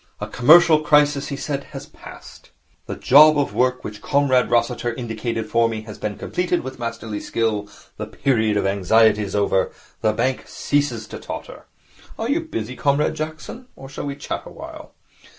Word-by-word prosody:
'A - - -3
commercial 155 +5 +6
crisis,' 145 -2 +3
he 140 - -4
said, 140 -1 -4
'has - - -9
passed. - - -14 0.4
The - - -4
job 150 +3 +6
of 145 - 0
work 125 0 +1
which 105 0 -8
Comrade 140 -3 +2
Rossiter 120 0 +1
indicated 115 -2 -4
for 115 +1 +2
me 110 -1 -5
has 110 -1 -10
been 105 -1 -4
completed 180 0 -1
with 130 0 -8
masterly 115 -3 -5
skill. 105 -3 -2 0.3
The - - -5
period 110 -6 0
of 100 - 0
anxiety 105 +3 +3
is 100 -1 -4
over. 100 -2 +1 0.3
The 110 - +2
bank 130 +4 -1
ceases 145 -6 -1
to - - -7
totter. - - -9 0.5
Are 225 - -3
you 310 - +2
busy, 130 - -5
Comrade 145 +2 +1
Jackson, 155 +11 -7
or 135 - -11
shall 135 - -6
we 140 - -4
chat 145 - -5
awhile?' - - -11
125 Hz, 170 wpm, -21 LUFS, 110-145 Hz, 0.5 s, commercial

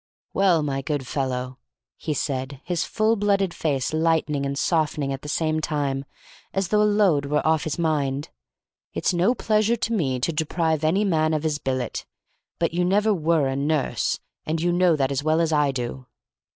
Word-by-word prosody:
"Well, 180 -5 +3
my 135 -2 -2
good 145 -1 -2
fellow," 130 -1 -3 0.4
he 155 - -3
said, 130 -1 -3
his 175 -1 -1
full 220 +1 +1
blooded 200 -3 +1
face 140 -3 -1
lightening 155 -3 +1
and 140 0 -3
softening 150 -3 0
at 135 - -6
the 150 - -7
same 155 +1 0
time, 140 -3 -1 0.5
as 195 -2 0
though 210 0 +3
a - - +5
load 190 -9 +3
were 150 +1 0
off 160 -2 +2
his 155 - -2
mind, 145 -4 0 0.7
"it's - - +1
no 180 +8 +2
pleasure 215 +1 +2
to 230 0 -2
me 135 - 0
to 160 +7 -1
deprive 160 0 0
any 175 +7 +2
man 155 -4 +2
of 155 - -2
his 155 -2 0
billet, 130 -3 -3 0.5
but 170 -1 0
you 175 +1 +1
never 205 +4 +3
were 165 -4 +2
a 135 - -1
nurse, 145 +1 0 0.2
and 160 +1 -2
you 175 +2 +1
know 175 -1 +4
that 135 -2 0
as 140 0 -1
well 155 +1 +2
as 165 -1 +1
I 150 -1 +3
do." 125 0 -5
155 Hz, 190 wpm, -24 LUFS, 140-175 Hz, 0.7 s, a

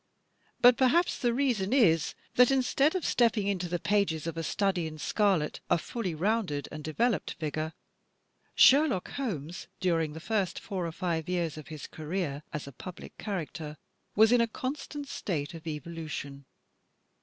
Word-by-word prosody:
But 245 -1 +8
perhaps 310 +7 +3
the 240 -3 +2
reason 235 -6 0
is 170 - +3 0.2
that 250 0 +6
instead 270 +4 +2
of 370 - -1
stepping 230 -4 +3
into 185 -3 -1
the 175 - 0
pages 185 -5 +1
of 165 -1 -3
"A 165 - -2
Study 185 0 0
in 155 0 -8
Scarlet" 185 -2 +1
a - - +4
fully 185 0 -4
rounded 185 -5 0
and 155 0 -7
developed 225 +9 0
figure, 155 0 -3 0.8
Sherlock 270 -9 +5
Holmes, 175 - -4
during 165 -4 +1
the 160 - -7
first 200 0 -1
four 185 -4 -3
or - - -4
five 170 -1 -2
years 170 -4 -1
of 155 -2 -9
his 155 -3 -7
career 155 -2 -3
as 150 -3 -4
a 140 - -9
public 180 +7 -10
character, 160 -6 -4 0.4
was 220 +2 +6
in 245 -1 +5
a 230 - +3
constant 285 +4 -5
state 160 - -3
of 165 0 -10
evolution. 150 -3 -6
180 Hz, 160 wpm, -29 LUFS, 160-230 Hz, 0.8 s, But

